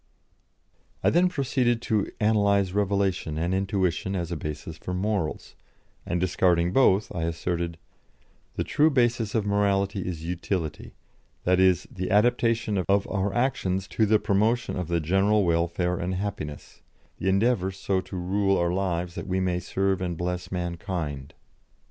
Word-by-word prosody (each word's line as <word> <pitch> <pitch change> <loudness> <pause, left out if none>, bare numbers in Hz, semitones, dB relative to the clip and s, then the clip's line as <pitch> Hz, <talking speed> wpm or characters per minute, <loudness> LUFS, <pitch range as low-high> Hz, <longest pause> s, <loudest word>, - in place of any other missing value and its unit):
I - - +4
then 180 +2 +4
proceeded 130 -6 +1
to 110 -3 0
analyse 100 -3 +3
revelation 100 -5 0
and 85 +3 0
intuition 95 -1 0
as 85 -2 -3
a - - -1
basis 75 +1 -6
for 90 - -4
morals, 95 -4 -2 0.5
and, 85 - 0
discarding 90 -1 +2
both, 105 -5 +3
I 85 - -2
asserted: 85 0 -2 0.8
"The - - -1
true 155 +2 +3
basis 120 -5 +1
of 110 -2 +1
morality 100 0 +1
is 85 -3 -4
utility; 85 -1 -3 0.5
that 90 0 +3
is, 95 -1 +4
the 95 -1 -4
adaptation 115 -1 +2
of 100 0 +3
our 100 -1 -1
actions 95 -5 0
to 110 - +1
the 110 +1 +5
promotion 110 +3 +1
of 90 -3 -3
the 85 0 +1
general 95 +5 +2
welfare 85 +1 0
and 90 +2 -2
happiness; 90 -7 -5 0.4
the 95 - 0
endeavour 100 -1 +2
so 95 0 -1
to 95 - -10
rule 95 +2 +1
our 85 0 +1
lives 90 -2 -1
that - - -6
we 95 0 0
may 90 -1 0
serve 95 +1 -1
and 90 -2 -2
bless 90 +1 -3
mankind." 85 -5 -4
95 Hz, 150 wpm, -26 LUFS, 90-105 Hz, 0.8 s, the